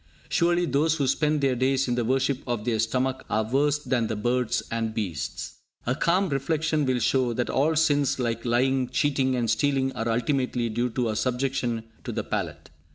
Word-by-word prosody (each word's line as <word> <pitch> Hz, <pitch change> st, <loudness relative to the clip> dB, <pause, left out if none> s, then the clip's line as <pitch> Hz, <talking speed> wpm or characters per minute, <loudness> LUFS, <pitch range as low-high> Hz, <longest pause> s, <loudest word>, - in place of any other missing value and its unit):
Surely 175 Hz, 0 st, +2 dB
those 150 Hz, +2 st, +2 dB
who 145 Hz, -4 st, 0 dB
spend 150 Hz, +3 st, +1 dB
their 135 Hz, -2 st, +2 dB
days 130 Hz, +2 st, +1 dB
in 125 Hz, -, 0 dB
the 120 Hz, 0 st, 0 dB
worship 130 Hz, +3 st, +1 dB
of 120 Hz, -3 st, -2 dB
their 115 Hz, -2 st, 0 dB
stomach 130 Hz, +4 st, 0 dB
are 110 Hz, -, +1 dB
worse 140 Hz, +6 st, +2 dB
than 125 Hz, -5 st, -1 dB
the 110 Hz, -, -2 dB
birds 120 Hz, +2 st, 0 dB
and 115 Hz, -1 st, -2 dB
beasts. 90 Hz, -10 st, -4 dB, 0.3 s
A 125 Hz, -, +1 dB
calm 180 Hz, +8 st, +2 dB
reflection 150 Hz, +1 st, 0 dB
will 130 Hz, -1 st, +2 dB
show 125 Hz, 0 st, +1 dB
that 120 Hz, +1 st, -1 dB
all 155 Hz, +4 st, +2 dB
sins 145 Hz, -3 st, +2 dB
like 115 Hz, -3 st, -2 dB
lying, 125 Hz, +1 st, +1 dB
cheating 135 Hz, -3 st, +1 dB
and 120 Hz, -2 st, 0 dB
stealing 135 Hz, +3 st, +1 dB
are 115 Hz, -2 st, -3 dB
ultimately 120 Hz, 0 st, 0 dB
due 120 Hz, +3 st, -1 dB
to 120 Hz, 0 st, -1 dB
our 110 Hz, -, -2 dB
subjection 125 Hz, -2 st, -1 dB, 0.2 s
to -, -, -4 dB
the -, -, -2 dB
palate. -, -, -4 dB
130 Hz, 190 wpm, -26 LUFS, 120-140 Hz, 0.3 s, Surely